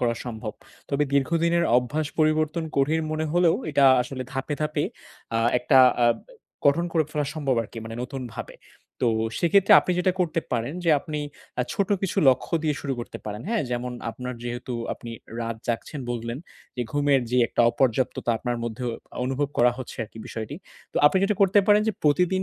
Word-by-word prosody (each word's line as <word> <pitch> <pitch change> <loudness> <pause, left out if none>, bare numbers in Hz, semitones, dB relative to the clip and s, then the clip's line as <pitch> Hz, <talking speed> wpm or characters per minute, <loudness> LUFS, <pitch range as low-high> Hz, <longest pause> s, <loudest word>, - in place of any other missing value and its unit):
করা 120 -1 +1
সম্ভব। 110 -3 -5 0.4
তবে 140 +1 +1
দীর্ঘদিনের 170 +5 +2
অভ্যাস 145 +5 0
পরিবর্তন 155 +1 +2
কঠিন 150 +4 +2
মনে 155 0 -1
হলেও 175 -1 +4 0.2
এটা 140 -1 +4 0.2
আসলে 130 +1 -5
ধাপে, 135 +3 -2
ধাপে 150 -1 0 0.5
আ - - +2 0.2
একটা 125 +3 +2 0.3
আ - - +6 0.6
গঠন 150 +5 +4
করে 160 -2 +2
ফেলা 150 -1 -1
সম্ভব 140 -4 0
আরকি 115 +1 -9
মানে 110 0 -7
নতুনভাবে। 125 -3 -6 0.5
তো - - +2 0.3
সেক্ষেত্রে 195 +3 +4
আপনি 180 - -1
যেটা 180 +1 +2
করতে 165 -2 +1
পারেন 120 +5 -1
যে 165 - +4
আপনি 150 +1 -5 0.4
আ - - +3
ছোট 200 -1 0
কিছু 195 - -2
লক্ষ্য 130 +6 +2
দিয়ে 150 -2 +1
শুরু 140 - -2
করতে 120 - -7
পারেন। 105 0 -5
হ্যাঁ? 230 -5 +1
যেমন 125 0 -2 0.2
আপনার 125 +2 -6
যেহেতু 120 +1 -5 0.2
আপনি 120 - -9 0.3
রাত 115 -1 -3
জাগছেন 120 +5 -3
বললেন, 120 +1 -3 0.4
যে 125 - 0
ঘুমের 145 -2 +3
যে 125 - +2
একটা - - -1
অপর্যাপ্ততা 120 0 0
আপনার 120 0 -2
মধ্যেও 120 +1 -3 0.3
অনুভব 135 +2 -1
করা 120 +1 +6
হচ্ছে 130 - -7
আরকি 110 +1 -14
বিষয়টি। 115 +6 -6 0.4
তো - - -8
আপনি 170 - +4
যেটা 195 0 +2
করতে 195 +1 +5
পারেন 210 0 +5
যে 220 - +1
প্রতিদিন 180 +5 +3
140 Hz, 175 wpm, -25 LUFS, 120-160 Hz, 0.6 s, আ